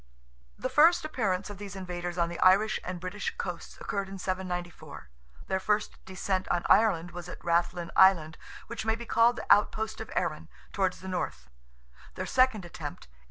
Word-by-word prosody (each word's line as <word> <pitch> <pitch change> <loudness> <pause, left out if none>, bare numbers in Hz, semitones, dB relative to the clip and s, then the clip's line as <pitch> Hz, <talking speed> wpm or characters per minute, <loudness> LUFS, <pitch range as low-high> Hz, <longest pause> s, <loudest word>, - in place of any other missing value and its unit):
The - - -2
first 320 +2 +5
appearance 205 -9 -1
of 200 - -9
these 205 -1 -7
invaders 175 -2 -5
on 170 -1 +2
the 170 0 -7
Irish 200 +4 +4
and 180 -1 -5
British 185 +3 -4
coasts 175 -2 -6
occurred 200 -1 -3
in 195 - -7
794. 180 - -5 0.4
Their 190 - -1
first 210 +2 -1
descent 190 0 -2
on 175 -1 +1
Ireland 185 -6 +3
was 175 0 -8
at - - -7
Rathlin 170 0 0
island, 165 -5 +5 0.3
which 235 - -5
may 220 0 +1
be 235 +1 -8
called 230 +1 +4
the - - -6
outpost 220 +1 0
of - - -7
Erin, - - -2 0.2
towards 190 -2 0
the 190 - -8
north; 65 - -4 0.6
their - - -3
second 255 -7 +2
attempt 160 -3 -8
(A. - - -28
185 Hz, 175 wpm, -29 LUFS, 175-210 Hz, 0.6 s, first